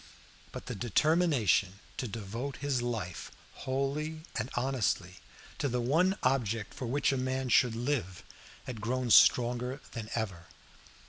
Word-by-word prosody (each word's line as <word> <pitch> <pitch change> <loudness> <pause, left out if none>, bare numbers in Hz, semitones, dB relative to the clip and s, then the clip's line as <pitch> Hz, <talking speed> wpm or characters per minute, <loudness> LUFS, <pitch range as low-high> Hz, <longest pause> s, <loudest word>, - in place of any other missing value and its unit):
But - - -8
the - - -4
determination 120 - +2 0.2
to 125 - -2
devote 115 +6 -5
his 140 -3 -1
life 110 -8 -4 0.2
wholly 140 +4 -2
and 110 +3 -2
honestly 120 -8 -1 0.4
to 140 - 0
the 125 0 -1
one 165 +11 +2
object 115 -5 0
for 125 - -5
which 140 +4 +1
a 135 - 0
man 130 0 -1
should 120 -1 +4
live 115 -7 -2 0.4
had 115 -4 -7
grown 125 +2 -1
stronger 125 +4 +5
than 110 -3 -6
ever. 95 -7 -3
125 Hz, 135 wpm, -31 LUFS, 110-135 Hz, 0.4 s, stronger